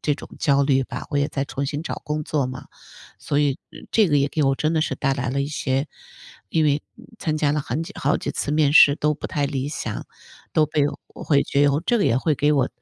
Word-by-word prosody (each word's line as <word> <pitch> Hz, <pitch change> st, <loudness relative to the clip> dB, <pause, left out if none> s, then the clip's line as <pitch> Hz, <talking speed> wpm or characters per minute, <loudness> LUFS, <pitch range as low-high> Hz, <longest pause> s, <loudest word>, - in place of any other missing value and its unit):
这 145 Hz, -, +1 dB
种 -, -, -11 dB
焦 140 Hz, -2 st, +3 dB
虑 135 Hz, -1 st, +3 dB
吧， -, -, -6 dB
我 145 Hz, -, 0 dB
也 145 Hz, -, +1 dB
在 135 Hz, 0 st, -2 dB
重 140 Hz, 0 st, -4 dB
新 145 Hz, +3 st, -3 dB
找 -, -, -5 dB
工 150 Hz, 0 st, -2 dB
作 145 Hz, -4 st, 0 dB
嘛。 130 Hz, 0 st, -8 dB, 0.5 s
所 145 Hz, -, -1 dB
以 145 Hz, -2 st, +1 dB, 0.3 s
这 215 Hz, -5 st, +4 dB
个 145 Hz, -, +3 dB
也 140 Hz, 0 st, +2 dB
给 155 Hz, -, -1 dB
我 135 Hz, 0 st, +3 dB
真 155 Hz, +4 st, 0 dB
的 160 Hz, -, +1 dB
是 140 Hz, -, -1 dB
带 135 Hz, +1 st, 0 dB
来 130 Hz, -2 st, -2 dB
了 140 Hz, +2 st, 0 dB
一 -, -, -2 dB
些 135 Hz, -1 st, -1 dB, 0.6 s
因 160 Hz, +6 st, +1 dB
为 145 Hz, 0 st, +2 dB, 0.4 s
参 155 Hz, -1 st, -1 dB
加 145 Hz, -2 st, +1 dB
了 150 Hz, -, 0 dB
很 140 Hz, +4 st, -3 dB
久 -, -, -8 dB
好 145 Hz, -, +2 dB
几 -, -, -4 dB
次 -, -, -3 dB
面 150 Hz, -1 st, +3 dB
试 145 Hz, -2 st, +8 dB
都 150 Hz, 0 st, +1 dB
不 145 Hz, -, -6 dB
太 145 Hz, -1 st, -1 dB
理 140 Hz, 0 st, -3 dB
想， 150 Hz, -, -5 dB, 0.5 s
都 155 Hz, -, +4 dB
被 150 Hz, -1 st, 0 dB, 0.3 s
我 -, -, -11 dB
会 140 Hz, -2 st, +3 dB
觉 140 Hz, +1 st, +1 dB
得， 145 Hz, +3 st, 0 dB
这 240 Hz, +1 st, +2 dB
个 200 Hz, -, +2 dB
也 115 Hz, -, +3 dB
会 150 Hz, +3 st, +1 dB
给 145 Hz, +3 st, +2 dB
我 135 Hz, -3 st, +2 dB
145 Hz, 270 characters per minute, -23 LUFS, 140-150 Hz, 0.6 s, 试